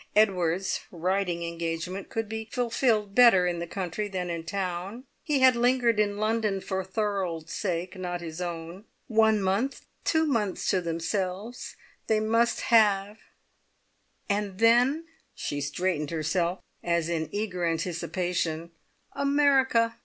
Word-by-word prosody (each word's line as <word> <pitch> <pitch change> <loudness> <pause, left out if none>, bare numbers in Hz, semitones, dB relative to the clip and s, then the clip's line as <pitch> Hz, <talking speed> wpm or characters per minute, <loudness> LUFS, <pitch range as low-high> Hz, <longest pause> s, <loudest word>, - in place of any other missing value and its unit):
Edward's 190 -3 +2
writing 180 0 -1
engagement 170 +3 -4
could 225 -4 -2
be 220 +1 -5
fulfilled 230 -5 +1
better 230 -6 +7
in 175 -1 -1
the 170 - -4
country 190 +3 -3
than 180 -3 -3
in 165 -1 -4
town. 190 +5 -4 0.2
He 290 -3 0
had 260 -1 +7
lingered 240 -2 +2
in 205 -1 +1
London 215 -2 0
for 190 0 -3
Thorold's 190 -5 -2
sake, 180 -1 -2
not 180 -1 -4
his 165 0 -7
own. 170 +3 -6 0.2
One 220 -3 +3
month, 200 +9 -1 0.2
two 320 -1 +2
months 225 -10 -1
to 190 - +1
themselves, 185 +6 -3 0.3
they 220 -1 +3
must 230 +2 +2
have, 210 -2 +3 1.1
and 200 -2 -1
then" 245 +8 +4 0.3
she 145 0 -3
straightened 150 +1 -1
herself 170 +3 -1 0.2
as 170 -1 +1
in 160 -2 -2
eager 200 -4 -3
anticipation 170 0 -2 0.4
"America! 270 -5 +3
195 Hz, 130 wpm, -27 LUFS, 175-225 Hz, 1.1 s, better